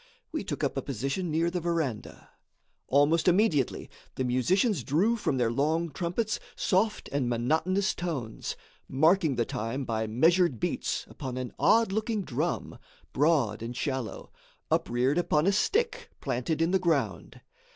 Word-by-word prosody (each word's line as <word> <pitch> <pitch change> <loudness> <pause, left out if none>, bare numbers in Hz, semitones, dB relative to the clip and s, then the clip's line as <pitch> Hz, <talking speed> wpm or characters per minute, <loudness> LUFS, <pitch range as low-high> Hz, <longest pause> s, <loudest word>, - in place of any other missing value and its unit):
We - - -3
took - - -4
up - - -1
a - - 0
position 140 - -3
near 165 +2 +1
the 180 - -1
verandah. 160 -9 -3 0.6
Almost 145 +5 +3
immediately, 180 - +2 0.3
the 130 - -1
musicians 145 - +1
drew 185 - +2
from 175 - -1
their 120 -2 +1
long 155 +6 0
trumpets 185 - -2 0.2
soft 210 +2 +1
and 140 -3 0
monotonous 160 - +1
tones, 140 -11 -4 0.3
marking 160 +2 +3
the 120 -1 +1
time 115 +6 -3
by 110 -1 -1
measured 160 - +3
beats - - -2
upon 130 -1 -6
an 125 -1 -4
odd 225 -3 +4
looking 215 0 -1
drum, 140 - -3 0.3
broad 140 -8 +2
and 120 +2 -5
shallow, 130 -5 -3 0.4
upreared 125 +6 +1
upon 155 -3 +2
a 195 - +4
stick 465 - 0
planted 150 +7 -1
in 165 - +1
the 190 - +3
ground. 140 - -1
155 Hz, 145 wpm, -28 LUFS, 125-185 Hz, 0.6 s, odd